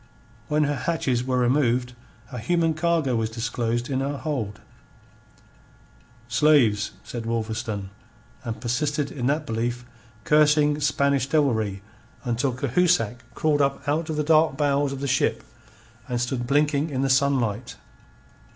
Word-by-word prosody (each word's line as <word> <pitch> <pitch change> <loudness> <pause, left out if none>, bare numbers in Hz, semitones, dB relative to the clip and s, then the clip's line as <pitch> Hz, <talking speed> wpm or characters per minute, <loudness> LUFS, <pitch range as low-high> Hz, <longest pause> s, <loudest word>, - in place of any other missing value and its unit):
When 150 0 +2
her 145 0 0
hatches 135 -7 -1
were 130 0 -1
removed, 125 -1 +1 0.4
a 125 - -5
human 165 +7 +1
cargo 155 -5 +1
was 110 -1 0
disclosed 120 +1 -2
in 130 -1 -1
her 140 +1 -2
hold. 125 -10 -3 1.7
"Slaves," 120 -4 +3
said 115 -2 -6
Wolverstone, 110 -3 -3 0.5
and 115 -3 -5
persisted 145 +4 -1
in 125 -3 -3
that 150 +2 0
belief 120 0 -3 0.4
cursing 150 0 +4
Spanish 140 -2 +1
devilry 110 -10 0 0.4
until 125 +2 0
Cahusac 130 - +1 0.2
crawled 150 -2 +2
up 140 +1 -1
out 155 +3 0
of 155 - -2
the 150 - 0
dark 155 -2 +3
bowels 145 -1 +1
of 140 0 -6
the 140 - -2
ship, 135 +1 +1 0.6
and 120 -1 -2
stood 120 0 -2
blinking 145 +2 +2
in 135 -2 -1
the - - +2
sunlight. 130 -4 +1
135 Hz, 135 wpm, -24 LUFS, 120-150 Hz, 1.7 s, cursing